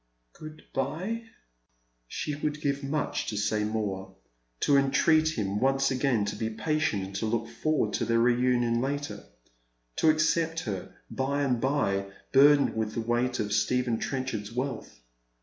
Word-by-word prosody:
"Good 155 0 -11
bve." 180 - -2 0.8
She 150 - -3
would 150 +1 -2
give 140 -1 -1
much 145 +2 -2
to 105 - -3
say 105 +1 0
more 100 -3 -3 0.2
— - - -46
to 140 - +4
entreat 155 +3 +3
him 100 -1 -1
once 135 +2 +2
again 130 -5 +1
to 105 - -3
be 110 +1 -2
patient 150 -3 -1
and 95 +1 -9
to 110 - -1
look 115 +1 -1
forward 155 -9 -1
to - - 0
their 115 0 +2
reunion 120 0 +2
later 140 -6 -3 0.4
— - - -45
to 160 - +4
accept 160 +1 +2
her 100 - -5 0.2
by 140 +2 -1
and 125 -4 0
bye, 100 -8 0 0.3
bui'dened 140 +1 +6
with 110 -1 -2
the 115 - -1
weight 120 +2 0
of 105 -1 -1
Stephen 115 +2 +1
Trencliard's 130 -6 -3
wealth. 120 - -4
125 Hz, 160 wpm, -28 LUFS, 105-145 Hz, 0.8 s, bui'dened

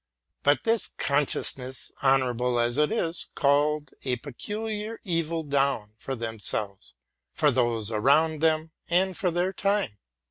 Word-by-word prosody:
But 145 +1 +3
this 230 -1 +2
con 140 0 +2
sciousness, 130 0 -2
honorable 125 -2 +2
as 120 +3 +1
it 150 - +3
is, 170 -7 0
called 145 +1 +2
a 130 -2 0
peculiar 210 - -5
evil 165 -3 -1
down 135 -7 0
upon 135 -1 -4
themselves, 110 -3 -3 0.4
on 150 -3 +4
those 120 -3 0
around 145 +8 +3
them, 160 0 +2 0.2
and 185 +2 +2
on 180 -3 +2
their 180 +2 +1
time. 195 - 0
145 Hz, 135 wpm, -27 LUFS, 125-165 Hz, 0.4 s, on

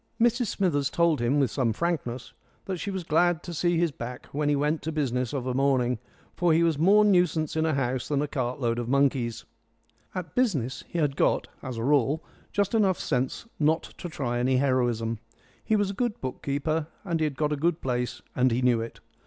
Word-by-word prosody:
Mrs 240 +1 +3
Smithers 145 -9 +1
told 170 -5 +2
him 125 +5 +2
with 135 -5 +2
some 120 -5 +1
frankness 130 -5 -3 0.3
that 185 -2 -3
she 200 - -3
was 190 -2 -3
glad 170 +1 +2
to 175 - -6
see 175 +1 +1
his 170 -1 +2
back 125 -1 -7
when 145 +1 0
he 145 - +3
went 150 +2 0
to 160 - -3
business 130 -5 -1
of 135 -4 -3
a 130 - -1
morning, 130 -3 +2 0.4
for 175 -2 +3
he 165 +1 +4
was 165 -3 +1
more 205 +6 +6
nuisance 175 -6 +2
in 160 0 +1
a 155 - +1
house 130 -2 -1
than 145 -2 0
a 150 - 0
cartload 125 -3 -1
of 120 0 -3
monkeys. 130 -4 +1 0.7
At 175 -5 -5
business 150 - 0
he - - -5
had 145 -4 +1
got, - - +2 0.2
as 130 -3 -5
a 115 - -3
rule, 145 +3 +2 0.3
just 200 0 0
enough 200 -5 +3
sense 130 - -1
not 160 +2 +2 0.2
to 175 - -5
try 120 -6 -2
any 130 +1 +2
heroism. 120 -4 +1 0.4
He 220 - +1
was 205 -2 +1
a - - -6
good 235 +1 -2
book 130 -1 -5
keeper 150 +3 -1 0.2
and 170 -3 -1
he 155 - +2
had 145 -3 -3
got 150 -1 +1
a - - +1
good 160 +3 0
place 125 -1 -2
and 130 +1 +4
he 125 +2 0
knew 120 -2 +3
it. 115 - -7
145 Hz, 215 wpm, -27 LUFS, 125-170 Hz, 0.7 s, more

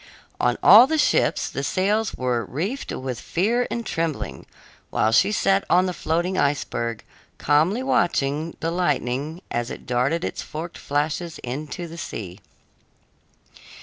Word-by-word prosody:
On 120 0 +2
all 220 +7 +9
the 315 +2 0
ships 295 - +2
the - - -4
sails 210 +3 0
were 125 -2 -1
reefed 185 - -4
with 130 -3 -4
fear 230 +8 0
and 235 -1 -3
trembling, 165 -5 -3 0.4
while 110 - +1
she 190 - +4
sat 195 -1 +2
on 180 +1 +4
the 180 - -2
floating 175 +3 -1
iceberg, 115 -5 -1 0.3
calmly 160 - +2
watching 160 - 0
the 165 - -1
lightning 150 -1 -1
as 120 0 -2
it - - -8
darted 130 +8 0
its - - -4
forked 165 +2 -7
flashes 155 +4 -2
into 150 +7 -5
the 165 +1 -9
sea. 95 - -6
160 Hz, 140 wpm, -23 LUFS, 130-185 Hz, 0.4 s, all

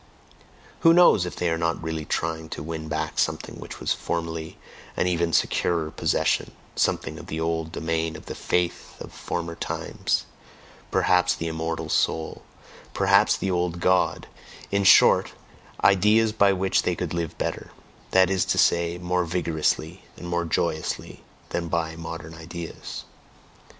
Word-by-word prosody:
who 165 - +6
knows 170 - +6
if - - -6
they 90 - -1
are 80 -1 0
not 85 0 -1
really 80 -1 -3
trying 80 0 -2
to - - -6
win 80 0 -5
back 80 0 -3
something - - -1
which - - -9
was - - 0
formerly 80 -1 -4 0.4
an - - +2
even 85 -2 +1
securer 80 +1 +1
possession, - - 0 0.2
something 80 +1 0
of 85 - -11
the 80 -5 -4
old 80 0 -1
domain 80 -1 -2
of - - -10
the - - -6
faith 90 -1 -2
of - - -9
former 85 -1 -4
times, - - -2 0.6
perhaps 90 0 +3
the 85 - -5
"immortal 80 0 -3
soul," 80 -1 0 0.5
perhaps 100 +2 +4
"the 95 - -2
old 90 -1 -1
God," 90 +1 +2 0.5
in 100 0 +2
short, 95 - +6 0.5
ideas 105 +3 +5
by 100 -2 +4
which 95 0 +1
they - - 0
could - - -4
live 85 -2 -3
better, - - -3 0.4
that 95 0 +4
is 95 -2 +2
to - - 0
say, 85 0 +3
more 90 0 0
vigorously 85 0 -1
and 90 - -8
more 85 0 -1
joyously, 80 -1 -2 0.3
than 85 -1 -2
by 80 -1 -1
"modern 80 -1 -7
ideas"? 85 +1 -7
85 Hz, 150 wpm, -25 LUFS, 80-90 Hz, 0.6 s, who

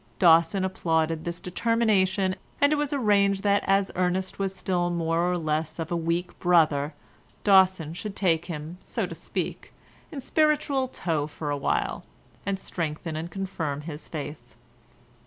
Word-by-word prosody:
Dawson 170 +2 +5
applauded 160 -3 0
this 170 0 -3
determination, 195 -2 +1 0.2
and 285 +1 +4
it - - +3
was 295 -2 -1
arranged 200 -7 +2
that 200 0 +3
as 195 0 +3
Ernest 185 +1 -1
was 195 -1 -1
still 180 -1 0
more 170 +1 +1
or 180 - 0
less 155 -1 -2
of 165 -1 -4
a - - +1
weak 170 +2 -2
brother, 155 -4 +3 0.5
Dawson 185 -5 +4
should 200 +3 -6
take 170 -4 +1
him, 165 +1 -6
so - - -2
to - - -7
speak, - - -4 0.4
in 290 - -5
spiritual 285 -2 +2
tow 160 - -1
for 150 -1 -5
a 145 - 0
while, 140 - -1 0.4
and 195 -1 0
strengthen 160 -3 -4
and 160 +2 -4
confirm 175 -7 -3
his 150 0 -7
faith. 145 -6 -7
175 Hz, 155 wpm, -26 LUFS, 160-195 Hz, 0.5 s, Dawson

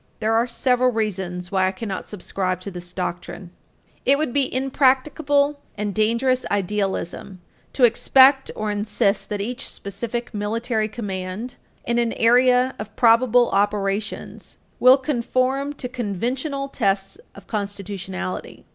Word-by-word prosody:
There 220 +1 +1
are 230 +2 +2
several 250 +1 +2
reasons 190 -5 -3
why 190 -1 +2
I - - 0
cannot 195 0 -5
subscribe 185 -2 -3
to 200 - -6
this 175 -1 -9
doctrine. 180 0 -5 0.5
It 275 +1 +4
would 300 -5 -1
be 280 -2 +1
impracticable 280 +2 +2 0.2
and 205 -1 -2
dangerous 235 +5 +1
idealism 195 -1 -2 0.3
to 265 - 0
expect 265 +3 +5
or 215 -1 -2
insist 205 -1 0
that 205 -1 -2
each 240 +4 -5
specific 235 +4 -5
military 220 +2 -1
command 200 +1 -5 0.3
in 235 0 +1
an 235 -1 0
area 250 +2 +4
of 210 0 -7
probable 240 +1 +4
operations 205 0 -2 0.2
will 255 +2 +7
conform 265 +1 -1
to 275 -3 -6
conventional 255 - -3
tests 195 -7 -1 0.2
of 200 - -13
constitutionality. 200 -3 -5
225 Hz, 130 wpm, -22 LUFS, 200-255 Hz, 0.5 s, will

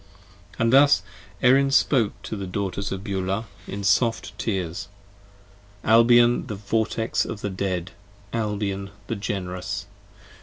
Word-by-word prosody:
And 115 +1 +2
thus 140 +1 +6 0.4
Erin 135 +2 +5
spoke 130 -5 +2
to - - -5
the 100 -2 -5
Daughters 100 +1 -3
of 95 0 -4
Beulah, 95 +1 -2 0.2
in 100 +1 -5
soft 115 +3 +1
tears. 95 -2 -2 1.0
Albion 120 +2 +5
the 105 - -4
Vortex 110 +2 0
of 105 - -6
the 100 - -3
Dead! 95 -2 -2 0.4
Albion 105 -3 -2 0.2
the 115 - -3
Generous! 95 -3 -4
105 Hz, 120 wpm, -24 LUFS, 95-115 Hz, 1.0 s, thus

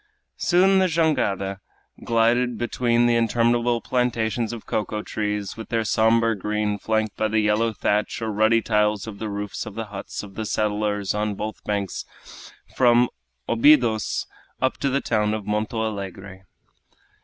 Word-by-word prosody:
Soon 190 +2 +4
the 190 - +3
jangada 100 - 0 0.4
glided 120 +1 +2
between 120 0 +1
interminable 120 0 +2
plantations 120 -2 -1
of 115 -2 -8
cocoa 105 0 -2
trees 105 -2 -3
with 110 - -9
their 115 -1 0
somber 115 +1 +3
green 105 0 -2
flanked 110 -1 -1
by 110 - +1
the 110 0 +1
yellow 105 +2 +2
thatch 105 0 -1
or 110 -1 -2
ruddy 110 +2 +3
tiles 105 -2 +1
of 105 -3 -8
the 110 - -3
roofs 105 +2 -5
of 105 - -8
the 115 - -4
huts 100 - -6
of 100 -2 -11
the 110 +2 -4
settlers 105 -2 -1
on 105 0 -1
both 110 +2 -6
banks 100 -2 -2 0.7
from 120 -1 +4 0.4
Obidos 115 -3 +3 0.3
up 130 - 0
to 140 - 0
the 140 +1 0
town 105 -1 0
of 105 -2 -6
Monto 110 +2 -1
Alegre. 95 -2 -7
110 Hz, 150 wpm, -23 LUFS, 105-120 Hz, 0.7 s, Soon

